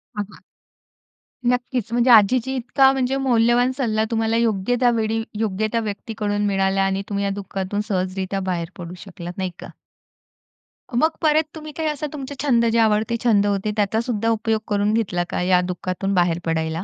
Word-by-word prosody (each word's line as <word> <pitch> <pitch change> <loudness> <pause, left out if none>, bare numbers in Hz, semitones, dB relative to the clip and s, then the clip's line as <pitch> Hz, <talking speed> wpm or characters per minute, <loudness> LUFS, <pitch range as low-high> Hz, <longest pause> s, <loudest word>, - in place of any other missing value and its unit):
हां, 205 0 -2
हां. - - -16 1.1
नक्कीच. 245 -2 -1
म्हणजे 240 +1 +2
आजीची 240 +4 +5
इतका 265 +2 +3
म्हणजे 265 0 0
मौल्यवान 245 -1 +3
सल्ला 220 -5 +1
तुम्हाला 225 0 +1
योग्य 230 0 +1
त्या 245 -1 +4
वेळी, 220 +1 -1 0.2
योग्य 215 -1 0
त्या 230 - +1
व्यक्तीकडून 205 -1 -3
मिळाला 195 -1 +1
आणि 195 0 0
तुम्ही 200 -1 -1
या - - 0
दुःखातून 195 +1 -3
सहजरीत्या 190 0 -2
बाहेर 170 -2 -3
पडू 175 -1 -7
शकलात, 175 -2 -8
नाही 185 -1 -2
का. - - -8 1.3
मग 315 +6 +4
परत 310 -1 +4
तुम्ही 310 -1 -8
काय 320 -1 -1
असा 300 0 -2
तुमचे 285 -1 -6
छंद 240 -5 +3
जे 230 - +2
आवडते 220 +1 +2
छंद 210 -4 +4
होते 200 +1 0
त्याचा 210 +2 +1
सुद्धा 230 -2 -1
उपयोग 220 -1 0
करून 205 0 +1
घेतला 195 -6 0
का, - - -2
या 180 0 +3
दुःखातून 185 +2 -3
बाहेर 175 -2 +2
पडायला? 160 +1 -1
215 Hz, 170 wpm, -22 LUFS, 195-240 Hz, 1.3 s, आजीची